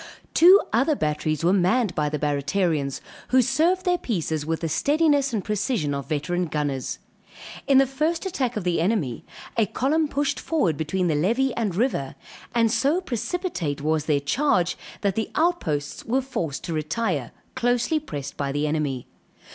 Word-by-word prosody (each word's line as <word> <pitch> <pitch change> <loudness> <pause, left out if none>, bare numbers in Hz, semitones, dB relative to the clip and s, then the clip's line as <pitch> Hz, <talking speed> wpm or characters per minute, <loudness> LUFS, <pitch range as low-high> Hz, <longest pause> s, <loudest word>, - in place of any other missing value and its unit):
Two 365 +4 +8
other 310 - +3
batteries 155 - -1
were 175 +3 +4
manned 200 +2 +2
by 150 -1 0
the 150 - -2
Barratarians, 145 0 0 0.3
who 260 - +4
served 345 +9 +2
their 355 -1 +2
pieces 160 - -2
with 165 0 -1
the 165 - -1
steadiness 285 - +2
and 210 -5 -2
precision 210 - -1
of 140 -1 -4
veteran 170 +4 -1
gunners. 145 -4 -2 0.7
In 275 - +5
the 270 - +6
first 310 +7 -1
attack 260 - -1
of 210 - -2
the 175 -2 +1
enemy, 170 - 0 0.3
a 220 -3 +3
column 295 +8 +1
pushed 285 0 -1
forward 200 - 0
between 160 +5 -1
the 160 - +2
levee 235 - +1
and 210 -7 -2
river; 190 - -1 0.4
and 230 -2 +3
so 290 +6 +2
precipitate 260 - -3
was 155 0 0
their 150 -3 +2
charge 180 - +1 0.3
that 200 -2 +1
the 220 +2 -2
outposts 165 - 0
were 260 +4 +1
forced 165 - -4
to 170 - -4
retire, 155 - -1 0.2
closely 245 +5 +1
pressed 145 - -6
by 140 -1 -2
the 145 +2 -1
enemy. 150 -5 -1
185 Hz, 165 wpm, -24 LUFS, -, 0.7 s, Two